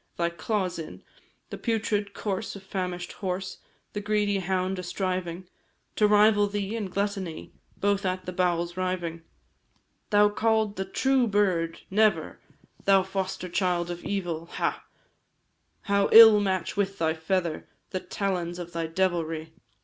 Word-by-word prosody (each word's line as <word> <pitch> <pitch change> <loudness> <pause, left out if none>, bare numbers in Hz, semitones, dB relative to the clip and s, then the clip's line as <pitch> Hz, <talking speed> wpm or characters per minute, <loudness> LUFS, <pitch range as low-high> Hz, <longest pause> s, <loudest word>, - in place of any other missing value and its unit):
thy 170 0 0
claws 185 0 -2
in 160 - -8 0.5
The - - -6
putrid 210 -3 -1
corse 205 +1 -3
of 200 - -10
famish'd 180 -2 -4
horse, 190 -1 -4 0.3
The 205 - -3
greedy 205 -1 +1
hound 185 0 -1
a - - -2
striving 180 -1 -3 0.5
To 210 - +5
rival 210 0 +5
thee 205 +1 -3
in 215 -4 -3
gluttony, 195 -3 -3 0.2
Both 200 0 +1
at 185 -1 -2
the 180 - -5
bowels 175 -1 0
riving. 180 -3 -2 0.9
Thou 205 -1 +5
called 220 0 +1
the 190 - -3
true 260 +5 +2
bird! 185 -6 +1
Never, 205 -6 +2 0.5
Thou 195 -1 +5
foster 190 -1 -3
child 175 -1 0
of 175 0 -7
evil, 175 -5 -3
ha! - - -2 1.0
How 200 -1 +1
ill 220 -2 +10
match 190 -3 -1
with 195 -1 -1
thy 160 -1 +1
feather 165 0 -2 0.2
The 185 - -1
talons 180 -3 -3
of 175 -1 -7
thy 165 -1 -2
devilry! 165 -2 -1
190 Hz, 140 wpm, -27 LUFS, 175-205 Hz, 1.0 s, ill